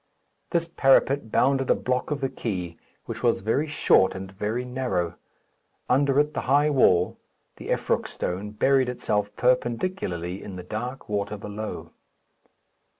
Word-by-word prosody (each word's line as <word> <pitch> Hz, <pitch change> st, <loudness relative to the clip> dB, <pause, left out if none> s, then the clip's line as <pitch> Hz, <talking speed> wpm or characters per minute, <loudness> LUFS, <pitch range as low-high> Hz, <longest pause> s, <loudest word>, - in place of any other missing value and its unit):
This 170 Hz, -1 st, 0 dB
parapet 135 Hz, -5 st, +3 dB
bounded 135 Hz, 0 st, +2 dB
a -, -, +5 dB
block 125 Hz, 0 st, -1 dB
of 145 Hz, -2 st, -2 dB
the 135 Hz, -, 0 dB
quay, 90 Hz, -10 st, -4 dB, 0.3 s
which -, -, -6 dB
was -, -, +2 dB
very 125 Hz, +9 st, 0 dB
short 145 Hz, -9 st, +3 dB
and 95 Hz, 0 st, -7 dB
very 105 Hz, +5 st, -3 dB
narrow. 125 Hz, -10 st, -2 dB, 0.7 s
Under 135 Hz, +2 st, +3 dB
it 150 Hz, +1 st, +1 dB
the -, -, -2 dB
high 145 Hz, +3 st, +3 dB
wall, 90 Hz, -10 st, +3 dB, 0.4 s
the -, -, -9 dB
Effroc -, -, 0 dB
stone, 95 Hz, +4 st, -4 dB
buried 130 Hz, +4 st, +2 dB
itself 105 Hz, -4 st, -1 dB
perpendicularly 120 Hz, -, -1 dB
in 100 Hz, -, -8 dB
the 90 Hz, -, -7 dB
dark 120 Hz, +8 st, -5 dB
water 105 Hz, 0 st, -2 dB
below. 105 Hz, +1 st, -6 dB
120 Hz, 145 wpm, -25 LUFS, 100-135 Hz, 0.7 s, a